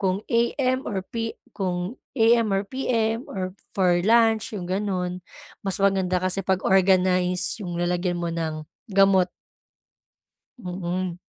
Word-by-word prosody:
kung 190 +1 0
AM 255 +3 +1
or 190 -3 -3
P 225 +1 -4 0.2
kung 185 +2 -3 0.2
AM 230 -1 +4
or 195 0 +1
PM 230 -1 -1
or 185 -1 -4 0.2
for 180 -2 +3
lunch, 225 +2 +3
yung 180 - -5
gano'n. 185 -1 -2 0.4
Mas 195 -2 -1
maganda 190 -2 +2
kasi 185 +1 0
pag-organize 185 0 +2
yung 175 -4 -4
lalagyan 175 +1 0
mo 170 -1 -2
ng 160 -2 -3 0.3
gamot. 195 -2 +4 1.3
Mm. 180 -2 -4
190 Hz, 120 wpm, -24 LUFS, 180-220 Hz, 1.3 s, AM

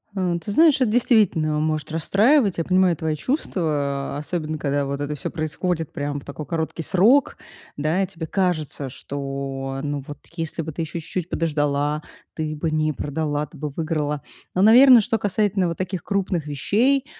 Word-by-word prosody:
Э, 180 -2 0
ты 205 - -4
знаешь, 310 +1 +5
эт 240 - +3
действительно 205 -10 +3
может 155 0 -1
расстраивать. 205 - +3
Я 165 - 0
понимаю 185 -2 +3
твои 160 -1 -1
чувства, 150 - -1
особенно 155 0 -3
когда 145 -1 -1
вот 140 0 -3
это 145 +1 -2
всё - - -4
происходит 160 0 -2
прям 145 0 -3
в - - -16
такой 140 +2 -7
короткий 165 +2 -3
срок. 230 - +3 0.4
Да, 155 +6 +1
и - - -2
тебе 165 -4 -7
кажется, 155 -7 -1
что, 135 0 -5
ну, 145 -2 -3
вот, 145 - -8 0.2
если 165 0 -3
бы 160 - -5
ты 160 - -5
еще 160 +1 -4
чуть-чуть 170 +2 -5
подождала, 150 -1 0 0.3
ты 155 -1 -3
бы 155 +2 -2
не 155 0 +1
продала, 150 0 -2
ты 150 +2 -16
бы 150 +1 -4
выиграла. 150 -1 -2 0.3
Но, 185 - +2
наверно, 240 +3 +8
что 225 +2 0
касательно 200 -2 +1
вот 170 - -3
таких 185 -2 -3
крупных 185 -5 -1
вещей, 240 - +1
160 Hz, 175 wpm, -23 LUFS, 145-190 Hz, 0.4 s, наверно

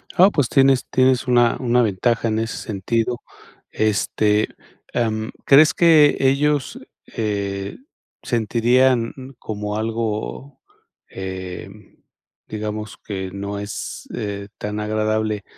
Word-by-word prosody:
Ah, 190 +2 +7
pues 140 -6 +1
tienes 135 -1 +4
tienes 130 0 +2
una 120 -1 +4
una 125 -1 +2
ventaja 115 +2 +1
en 110 0 0
ese 115 +1 -3
sentido. 115 +4 -2 0.5
Este, 105 0 +1 0.4
em, 110 -2 -1
¿crees 150 +3 +7
que 155 -4 +5
ellos, 140 +1 +1 0.4
eh, 100 -2 -3 0.5
sentirían, 120 +1 +2 0.3
como 105 -1 -4
algo, 115 +4 -3 0.5
em, 95 +1 -8 0.5
digamos, 105 0 -5
que 95 -2 -5
no 100 +1 -5
es, 100 0 -6
eh, 100 -1 -4
tan 105 0 -4
agradable, 110 -1 -1
110 Hz, 105 wpm, -21 LUFS, 105-125 Hz, 0.5 s, Ah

